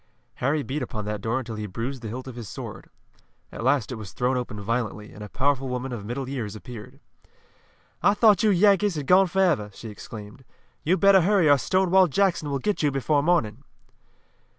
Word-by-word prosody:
Harry 140 +3 0
beat 140 +3 -4
upon 110 -4 -5
that 105 -1 -4
door 115 +4 -1
until 120 -3 -5
he 105 0 -4
bruised 120 +7 -5
the 115 - -6
hilt 125 +4 -6
of 130 - -8
his 115 -6 -8
sword. - - -8 0.6
At - - -7
last 135 -1 +1
it 125 - -5
was 100 -5 -9
thrown 125 +1 0
open 125 -4 -4
violently, 105 0 -3
and 105 - -9
a 105 - -8
powerful 135 +1 0
woman 125 +1 -3
of 115 -4 -5
middle 125 +3 -4
years 115 -6 -4
appeared. 125 +3 -10 1.0
"I 200 - +4
thought 210 -1 +5
you 220 - +3
Yankees 200 0 +3
had 145 -2 -4
gone 185 +5 +5
forever!" 175 - +1
she 115 - -8
exclaimed. 105 +3 -10 0.4
"You'd 180 +3 +1
better 195 -1 +6
hurry 190 -2 +3
or 145 -1 +6
Stonewall 185 +5 +3
Jackson 170 -2 +1
will 140 - -1
get 205 +10 -1
you 150 - +3
before 140 +2 +1
morning!" 140 -8 +1
130 Hz, 195 wpm, -25 LUFS, 115-175 Hz, 1.0 s, better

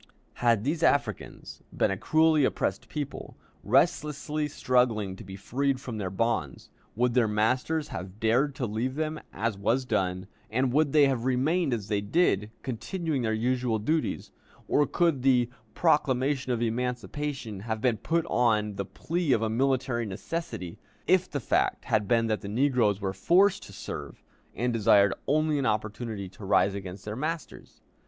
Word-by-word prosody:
Had 115 -3 +3
these 155 +5 -1
Africans 120 - -1
been - - +1
a - - 0
cruelly 155 +7 +3
oppressed 100 -6 -1
people, 145 -2 -6 0.3
restlessly 150 - +1
struggling 125 -8 +1
to 110 - -11
be 95 -1 -9
freed 135 +6 -1
from 125 -5 -6
their 95 -2 -2
bonds, 95 - -2 0.2
would 120 +2 +1
their 120 -2 +3
masters 125 +9 0
have 95 +4 -7
dared 125 +6 +2
to 130 - -2
leave 115 +4 -2
them, 155 0 -2
as 105 0 -2
was 125 +6 +1
done, 95 -5 -1 0.2
and 125 +2 0
would 150 0 +3
they 150 -1 +6
have 130 -3 0
remained 140 +5 +1
as 110 -5 -2
they 105 -2 0
did, 105 - +1
continuing 150 - -3
their 110 -2 0
usual 125 0 0
duties, 155 +9 -1 0.4
or 145 - +3
could 165 -7 +1
the 125 -2 +3 0.2
proclamation 140 -4 +1
of 120 -1 0
emancipation 125 0 -3
have 110 +2 -3
been 120 -1 +1
put 165 +9 0
on 110 -8 +1
the 100 - -2
plea 160 - -1
of 115 -2 +1
a 110 - 0
military 130 -1 0
necessity, 105 - -5 0.3
if 185 +1 +3
the 145 - -2
fact - - 0
had 105 -2 +1
been 115 0 +3
that 110 -1 -1
the 100 - -6
negroes 120 -4 +2
were 95 -2 -2
forced 180 - +3
to - - -11
serve, - - -7 0.3
and 120 +3 0
desired 100 -3 +4
only 155 +1 +2
an 135 - 0
opportunity 105 -1 -2
to 95 +3 -14
rise 100 0 +3
against 95 -1 -7
their 105 0 -4
masters? 155 +5 -5
120 Hz, 165 wpm, -28 LUFS, 105-145 Hz, 0.4 s, they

